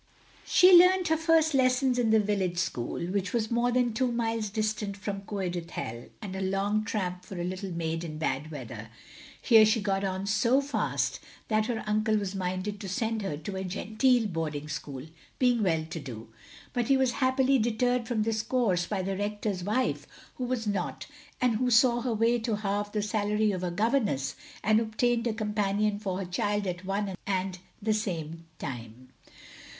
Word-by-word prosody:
She 365 0 +7
learnt 365 0 +6
her 320 - +4
first 320 -1 +3
lessons 255 -1 +3
in 235 -2 +2
the 220 0 +5
village 195 -4 0
school, 125 -9 -2
which 190 +1 -2
was 230 -1 0
more 240 +1 +2
than 245 -2 +2
two 250 +2 +1
miles 225 -2 -1
distant 210 -1 -2
from 200 0 -4
Coed 195 -3 -3
Ithel, 120 -9 -6
and 190 -2 -5
a 190 - -3
long 195 +3 0
tramp 185 -5 -3
for 185 -1 -8
a - - -2
little 185 +2 -4
maid 165 -1 -2
in 155 -2 -6
bad 155 -1 -2
weather. 120 -7 -8 0.5
Here 225 -3 +7
she 215 +2 +3
got 195 -1 -1
on 190 0 -2
so 220 +6 +3
fast 280 +1 -1 0.3
that 215 -1 +2
her 230 -2 -2
uncle 215 +1 +1
was 200 -2 -2
minded 185 +2 -3
to 200 -3 -6
send 220 +3 -1
her 170 -7 -3
to 190 +6 -6
a 190 - -3
genteel 220 +6 +1
boarding 155 -6 -3
school, 145 -3 -6 0.3
being 245 -3 +3
well 165 -5 +1
to 165 - -4
do; 115 -6 -8 0.4
but 240 -2 0
he 270 - +4
was 260 -2 +2
happily 260 +1 +3
deterred 240 +1 +1
from 230 -4 0
this 220 0 0
course 215 -9 +1
by 195 -3 -2
the 195 +1 -2
Rector's 205 -1 -2
wife, 215 +7 0 0.3
who 255 - -2
was 245 -2 -2
not, 205 -2 -2 0.3
and 245 -3 +2
who 250 +2 +1
saw 240 0 +5
her 245 -1 -1
way 230 +2 +2
to 225 -1 -1
halve 205 0 -2
the 210 -1 -1
salary 210 0 +1
of 185 -2 -3
a 180 - 0
governess 205 - 0 0.3
and 215 +1 +4
obtained 230 +2 0
a 230 - 0
companion 210 -1 0
for 190 -3 -3
her 195 - -3
child 205 +3 -1
at 180 0 -4
one 195 0 -2
and 190 -1 -1 0.2
the 215 +1 +1
same 165 -6 -4
time. 125 -2 -7
210 Hz, 185 wpm, -28 LUFS, 185-230 Hz, 0.5 s, She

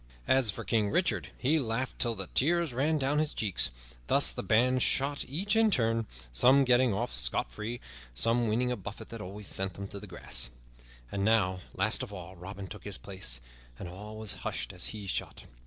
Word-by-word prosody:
As 130 -4 +4
for 100 - -3
King 110 -3 +1
Richard, 175 - +1
he 150 +5 +2
laughed 125 0 -2
till 120 -2 +1
the 95 -2 -4
tears 170 0 +2
ran 150 +6 +1
down 145 +1 +1
his 155 -1 -1
cheeks. 95 - +2 0.4
Thus - - +5
the - - -4
band 125 +3 +3
shot, 140 +3 +2
each 190 - 0
in 225 0 +5
turn, 115 - +1 0.2
some 130 - +6
getting 125 -1 +4
off 95 -10 -2
scot - - 0
free, 105 - -5
and - - -10 0.4
some 115 - +2
winning 120 +3 +1
a - - 0
buffet 100 0 -8
that 115 -2 -7
always 100 +2 -6
sent 95 -1 0
them 100 0 -6
to 100 - -5
the 105 - -10
grass. 85 -8 -1 0.6
And 100 - -2
now, 100 -4 +3 0.2
last - - +4
of - - -5
all, 95 -2 -8
Robin 95 +3 -8
took 105 +3 -9
his 100 -2 -4
place, 80 -12 -2 0.4
and - - -7
all 105 +5 -9
was 110 -2 0
hushed - - -3
as 90 - -2
he 105 -2 -6
shot. 95 - -3
110 Hz, 205 wpm, -30 LUFS, 95-130 Hz, 0.6 s, some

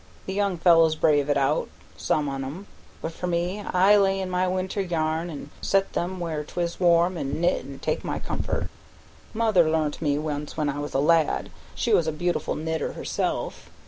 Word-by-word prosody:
The 190 - -4
young 200 -2 0
fellows 165 -2 +5
braves 145 -2 +2
it 145 - +3
out, 135 - +1 0.3
some 115 - 0
on 135 -1 -3
'em; 155 +10 -7 0.4
but, 160 - -2
for 180 +2 -5
me, 175 +3 -1
I 195 +1 +4
lay 195 -1 +3
in 185 -1 -3
my 180 +1 +1
winter's 185 +1 -2
yarn 160 0 0
an' 145 -2 -8
set 195 0 +2
here 175 - 0
where 170 -5 -4
'tis 170 +2 -3
warm, 175 0 +3
an' 140 +1 -3
knit 175 +1 +1
an' 140 -1 -9
take - - -2
my - - -2
comfort. - - -3 0.7
Mother 215 -8 +3
learnt 155 -1 0
me 145 -2 +1
once 150 -1 -4
when 150 -2 +1
I 145 +1 -3
was 145 -1 -5
a - - +3
lad; 160 +1 +2 0.2
she - - 0
was 165 - +4
a - - +1
beautiful 175 +3 -1
knitter 160 +1 -2
herself. - - -3
165 Hz, 195 wpm, -25 LUFS, 150-180 Hz, 0.7 s, fellows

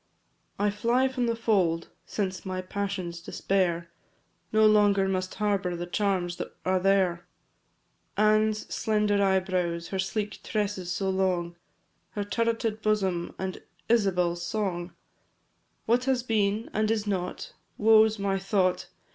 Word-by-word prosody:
I. 205 - 0
I - - +4
fly 235 +5 +2
from 250 -2 -1
the 230 - +1
fold, 185 -8 +1 0.2
since 190 -3 -3
my 185 -1 -4
passion's 185 -2 -4
despair 170 -2 -1 0.6
No 215 0 +5
longer 205 -2 +4
must 185 -1 -2
harbour 200 -4 0
the 175 +1 -4
charms 180 -1 -1
that - - -6
are 185 0 +2
there; 185 -2 +2 0.9
Anne's 215 0 +3
slender 210 -2 +1
eyebrows, 185 -3 0
her 190 - -3
sleek 205 +2 -3
tresses 200 -4 -2
so 190 +1 -1
long, 180 -2 0 0.6
Her 205 - -2
turreted 225 +1 -1
bosom 190 -5 0
and 190 0 -4 0.3
Isabel's 180 -6 +2
song; 180 -3 -2 0.9
What 240 +3 +2
has 260 -3 +1
been, 215 -2 0
and 215 0 +1
is 220 -2 0
not 185 -3 -3 0.2
woe 220 0 +6
's 220 0 -4
my 195 -1 0
thought! 190 -2 0
195 Hz, 135 wpm, -27 LUFS, 185-215 Hz, 0.9 s, woe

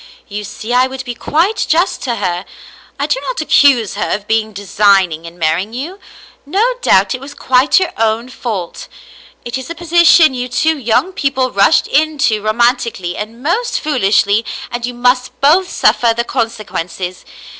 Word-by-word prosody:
You 210 0 -6
see 215 +3 -6
I 250 +1 +4
would 265 0 -7
be 245 - -4
quite 345 - 0
just 345 +4 +1
to 240 -4 -2
her. 180 -4 -2 0.6
I - - 0
do - - 0
not - - -4
accuse 280 -7 +3
her 205 - -3
of 210 0 -3
being 220 -1 0
designing 195 -4 +1
in 170 +1 -11
marrying 170 +6 -1
you. 320 +11 -6 0.4
No 405 - 0
doubt 190 - +3
it 255 - -6
was 285 +1 -10
quite 260 +7 +3
your 370 - -1
own 225 +2 0
fault. 210 -9 -5 0.6
It 240 +2 -4
is 260 - -9
a 335 - -5
posi 345 0 +2
tion 315 -3 +6
you 250 -1 -3
two 315 +6 +1
young 270 +8 0
people 265 -5 -1
rushed 200 0 +3
into 290 -7 +1
romantically 230 -4 0
and 225 +4 -7
most 430 +11 0
foolishly, 215 -6 +1 0.3
and 240 0 -3
you 245 - -6
must 250 +1 0
both 340 +7 +3
suffer 230 -2 +2
the 235 - +1
consequences. 185 -6 -4
245 Hz, 170 wpm, -15 LUFS, 210-290 Hz, 0.6 s, tion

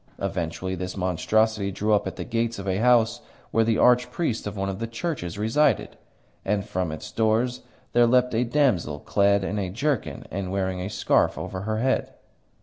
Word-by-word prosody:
Eventually 95 -1 -3
this 95 +1 -5
monstrosity 100 +3 +1
drew 105 +3 0
up 105 - +2
at - - -5
the - - -5
gates 115 0 -1
of 100 0 -6
a 95 0 +1
house 115 0 +3 0.3
where 115 - +3
the 110 0 +1
archpriest 125 0 +2
of 105 0 -6
one 95 0 -1
of 95 0 -4
the 115 - -3
churches 115 - -4
resided, 115 +9 +1 0.5
and 100 0 0
from 90 -5 -2
its 80 - -7
doors 115 +3 +1 0.3
there 120 0 +5
leapt 125 +1 +3
a 115 +2 +2
damsel 120 - +1
clad 100 +2 +2
in 100 +2 -2
a 95 -2 -2
jerkin 130 +6 -2
and 95 -1 -3
wearing 95 -1 -1
a 95 - -3
scarf 105 - +2
over 95 - -5
her 110 - 0
head. 130 +1 0
105 Hz, 185 wpm, -25 LUFS, 95-120 Hz, 0.5 s, there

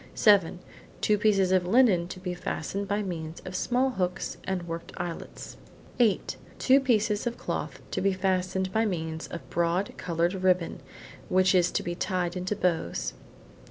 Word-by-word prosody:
Seven: 200 -6 +4 0.4
two 210 -1 +2
pieces 195 -3 +3
of 185 -1 +3
linen 200 -6 +4
to 185 - -8
be 180 -1 -3
fastened 195 +3 -3
by 205 +1 0
means 165 -4 -5
of 185 - -6
small 250 +7 +1
hooks 185 -4 -2
and 180 -2 -2
worked 165 0 -6
eyelets. 175 -1 -6 0.4
Eight: 225 -5 +2 0.2
two 270 +1 +5
pieces 225 -4 +1
of 240 - -3
cloth 150 -5 -4
to - - -1
be 195 +1 +3
fastened 185 0 0
by 220 - +3
means 160 -6 -3
of 170 - -8
broad 170 +3 0
coloured 170 +1 0
ribbon, 180 -2 +2 0.5
which 185 0 +4
is 180 -1 +4
to - - 0
be 175 - -3
tied 175 -1 -1
into 185 +3 -2
bows. 90 - -1
185 Hz, 160 wpm, -28 LUFS, 175-205 Hz, 0.5 s, two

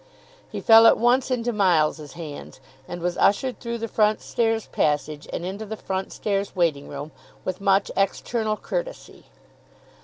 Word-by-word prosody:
He - - -5
fell 225 0 +8
at - - +6
once 245 +3 +2
into 240 -2 -1
Miles's 160 -7 +1
hands, 155 -5 -9 0.3
and 175 -1 -7
was 180 0 -2
ushered 245 +4 +2
through 235 0 -4
the 230 0 -4
front 215 -1 +2
stairs 225 -1 -1
passage 150 0 -1
and 170 - -4
into 195 +4 -5
the 220 +1 -6
front 190 -1 -4
stairs 200 -1 -2
waiting 160 -6 0
room, 145 +2 -7 0.3
with 185 +1 -4
much 195 0 +2
external 215 +2 -1
courtesy. - - -6
200 Hz, 155 wpm, -24 LUFS, 170-225 Hz, 0.3 s, fell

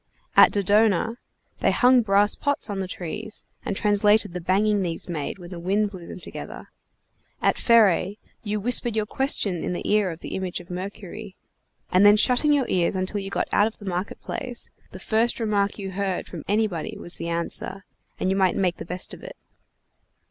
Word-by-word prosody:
At - - +8
Dodona, 210 +3 +2 0.4
they - - +2
hung 250 0 +5
brass 205 -1 +3
pots 285 -6 -1
on 200 - -3
the 190 - -3
trees 200 +5 -6 0.2
and 200 - -3
translated 205 -1 +3
the 180 - -4
banging 200 +4 +2
these 170 -3 -3
made 160 -2 -4
when 175 -1 -11
the 175 - -6
wind 200 +4 0
blew 180 -4 -10
them - - -8
together. - - -9 0.7
At - - +2
Pheræ, 205 -4 +4 0.2
you 210 -1 -2
whispered 240 +1 +2
your 215 -1 0
question 210 - +1
in - - -2
the - - -4
ear 210 -2 +2
of 165 -1 -8
the - - -7
image 185 -1 -3
of 180 0 -12
Mercury, 195 +2 -7 0.6
and 185 +2 +5
then 205 +1 +7
shutting 250 +6 +3
your 280 -4 +2
ears 180 0 +1
until 185 +2 -2
you 195 0 -5
got - - -1
out 205 - +4
of 225 - -8
the 205 - -12
market 185 +1 -3
place, 245 -1 -5 0.2
the - - -10
first 220 +6 0
remark 205 -3 0
you 195 -2 -5
heard 190 -1 -2
from - - -8
anybody 205 -5 -1
was 175 - -3
the 170 - -4
answer, 170 +3 -2 0.3
and 185 - 0
you - - +1
might 190 -2 +2
make 180 -2 0
the - - -7
best 180 +2 -2
of - - -10
it. - - -10
200 Hz, 195 wpm, -24 LUFS, 185-215 Hz, 0.7 s, At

